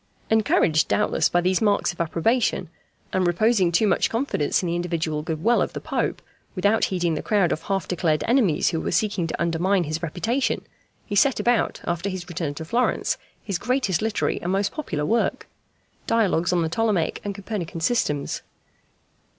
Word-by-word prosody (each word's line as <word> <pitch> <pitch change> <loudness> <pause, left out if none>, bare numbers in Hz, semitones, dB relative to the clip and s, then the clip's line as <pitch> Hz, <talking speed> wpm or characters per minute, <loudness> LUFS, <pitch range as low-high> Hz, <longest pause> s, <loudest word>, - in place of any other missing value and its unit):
Encouraged, 195 -7 +3
doubtless, 210 - +2
by 175 - +2
these 185 +3 +1
marks 205 -4 +2
of 175 - -5
approbation, 170 +4 0 0.4
and 185 -1 +2
reposing 185 0 +3
too 175 +6 +3
much 205 - +2
confidence 230 - 0
in - - -1
the 170 - -1
individual 165 -3 -2
good 160 0 -4
will 235 +1 +4
of - - -1
the - - -4
Pope, - - -2 0.3
without 205 +4 +2
heeding 175 -3 0
the 150 - -2
crowd 200 -5 +2
of 155 - -1
half 195 +1 -2
declared 160 -4 0
enemies 230 - +3
who 165 - -2
were - - -2
seeking 185 -1 0
to - - -4
undermine 175 +3 +1
his 155 +1 -3
reputation, 220 - -1 0.4
he 205 - -4
set 270 +6 +4
about, 240 -1 +1
after 175 +3 -2
his 185 -2 -5
return 165 -5 -3
to 160 - -6
Florence, 240 +9 0 0.2
his 195 -4 -3
greatest 245 -7 0
literary 220 -1 -1
and 175 - -2
most 195 +1 +1
popular 160 - -3
work, 230 +8 0 0.6
Dialogues 190 -7 +2
on 175 -2 +2
the 160 - -1
Ptolemaic 195 -3 0
and 200 -1 -4
Copernican 190 -4 -5
Systems. 160 -7 0
185 Hz, 175 wpm, -24 LUFS, 165-215 Hz, 0.6 s, will